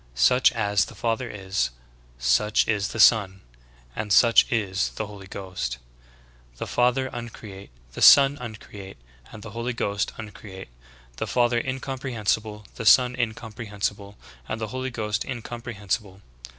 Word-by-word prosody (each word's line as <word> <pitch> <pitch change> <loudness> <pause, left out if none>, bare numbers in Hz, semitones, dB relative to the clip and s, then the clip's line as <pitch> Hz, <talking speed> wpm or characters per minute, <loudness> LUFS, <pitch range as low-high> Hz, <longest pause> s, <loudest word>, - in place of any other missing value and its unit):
Such 125 - +4
as 105 -3 +1
the - - -12
Father 115 +1 -2
is, 95 -11 -2 0.5
such 60 - +2
is 105 -3 0
the 110 - -6
Son; 100 -4 +5 0.5
and 105 -1 -4
such 115 +3 +5
is 95 -5 0
the 110 - -3
Holy 100 -2 -11
Ghost. 95 -11 -5 0.8
The - - -4
Father 125 +2 +1
un 120 0 -5
create, 100 -3 -11 0.2
the - - -7
Son 140 0 +8
uncreate, 105 -4 -9 0.3
and 110 -2 -11
the 110 - -9
Holy 115 +3 -3
Ghost 100 -3 -2
uncreate. 100 - -10 0.5
The - - -3
Father 120 -1 +2
incomprehensible, 120 -5 -3
the 115 - -5
Son 125 +2 +6
incomprehensible 105 -3 -4 0.3
and 110 - -3
the 110 -1 -4
Holy 130 +3 -4
Ghost 110 -2 -2
incomprehensible. 115 -4 -5
110 Hz, 135 wpm, -25 LUFS, 100-120 Hz, 0.8 s, Son